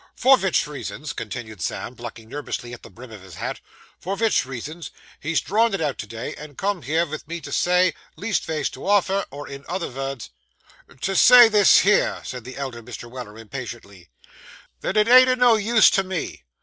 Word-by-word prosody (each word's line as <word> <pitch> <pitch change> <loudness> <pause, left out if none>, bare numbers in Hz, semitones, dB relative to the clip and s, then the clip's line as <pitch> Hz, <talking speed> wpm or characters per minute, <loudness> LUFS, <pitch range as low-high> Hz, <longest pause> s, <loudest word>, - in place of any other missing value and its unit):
'For 265 +2 +6
vich 190 -8 +1
reasons,' 150 0 -6
continued 110 -3 -7
Sam, 120 - -4
plucking 115 -2 -9
nervously 125 -2 -6
at 125 - -10
the - - -13
brim 125 0 -13
of 105 -3 -11
his 95 -2 -13
hat - - -5 0.4
'for 195 +2 -4
vich 220 - +1
reasons, 145 +6 -7 0.3
he's 160 +2 0
drawn 220 +2 +1
it - - -4
out 150 -4 -2
to 105 - -6
day, 115 +2 -6
and 150 -2 -11
come 200 -2 -1
here 160 +6 0
vith 155 -2 -8
me 170 +1 -5
to - - -9
say, 180 +1 +2 0.2
leastvays 160 -8 -2
to 130 - -9
offer, 200 -1 +2
or 145 +2 -9
in 140 0 -9
other 180 -1 -3
vords 135 -1 -5 0.4
' 130 - -24
'To 195 +5 -1
say 245 +2 +8
this 210 -2 +6
here,' 205 +1 +2
said 125 -3 -7
the 130 +1 -9
elder 130 -4 -5
Mr. 120 0 -9
Weller 120 -4 -9
impatiently, 115 -5 -9 0.7
'that 205 - -2
it 210 0 +4
ain't 255 +1 +8
o' 255 - +3
no 245 -2 +5
use 220 +1 +4
to 195 - +2
me. 185 - -5
150 Hz, 200 wpm, -23 LUFS, 125-195 Hz, 0.7 s, say